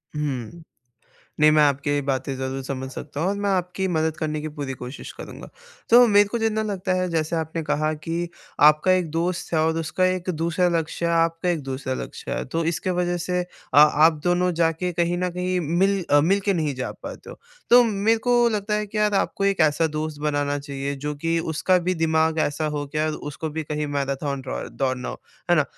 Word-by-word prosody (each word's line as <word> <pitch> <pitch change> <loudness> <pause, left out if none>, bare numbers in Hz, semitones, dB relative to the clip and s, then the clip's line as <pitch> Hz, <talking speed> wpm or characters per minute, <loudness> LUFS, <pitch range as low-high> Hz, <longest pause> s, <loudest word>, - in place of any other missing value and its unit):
हुँ। 145 +1 -4 0.8
नहीं, 155 0 +7
मैं 155 0 +5
आपकी 145 0 +1
बातें 135 0 -2
ज़रूर 130 +1 -4
समझ 130 0 -4
सकता 145 +2 -7
हूँ 175 - +1
और 200 - 0
मैं 205 0 -1
आपकी 185 0 -1
मदद 160 -2 0
करने 155 -1 -2
की 155 - -4
पूरी 145 -3 -5
कोशिश 125 +2 -8
करूँगा। - - -10 0.4
तो 240 +1 +8
मेरे 205 -2 +5
को 235 - -2
जितना 220 -1 0
लगता 195 -3 -2
है 185 - -1
जैसे 160 0 -1
आपने 160 +1 -3
कहा 155 +1 0
कि 165 +3 -3 0.3
आपका 150 +5 +6
एक 180 -4 +1
दोस्त 170 +2 -2
है - - +3
और 160 +1 +1
उसका 165 +3 -1
एक 185 0 0
दूसरा 170 +2 +1
लक्ष्य 165 +1 -3
है, 170 - +1
आपका 165 +1 +1
एक 165 -3 -1
दूसरा 130 0 -4
लक्ष्य - - -7
है, - - -2
तो 165 +5 -2
इसके 170 +3 -1
वजह 175 0 0
से 180 +1 -1
अ, - - -10 0.3
आप 150 +2 +6
दोनों 180 +1 +2
जाके 165 +1 0
कहीं 175 +1 0
न 180 0 0
कहीं 180 +1 -1
मिल 185 +5 +1
अ, 145 - +6
मिलके 195 +5 +2
नहीं 155 -5 -1
जा 130 0 -4
पाते - - -8
हो। - - -11 0.3
तो 245 +1 +9
मेरे 220 +1 +2
को 240 -1 +4
लगता 210 -1 -1
है 210 0 -1
कि 210 +1 -5
यार, 210 -1 +2
आपको 195 0 0
एक 195 -3 +1
ऐसा 155 +1 +3
दोस्त 155 -1 -4
बनाना 145 -1 0
चाहिए 140 -1 -4
जो 150 - -1
कि 165 +3 -1
उसका 165 +3 +1
भी 185 - +2
दिमाग 160 -1 +1
ऐसा 145 +2 -2
हो 145 -1 -3
कि 150 +2 -4
यार 155 0 +1
उसको 150 +2 -5
भी 160 +1 -3
कहीं 150 0 -3
मैराथन 140 0 -2
ड्रॉ 130 -1 -5
दौड़ना 130 -2 -2
हो। - - -7 0.3
है 175 - +5
ना? 155 - +4
160 Hz, 215 wpm, -23 LUFS, 150-180 Hz, 0.8 s, तो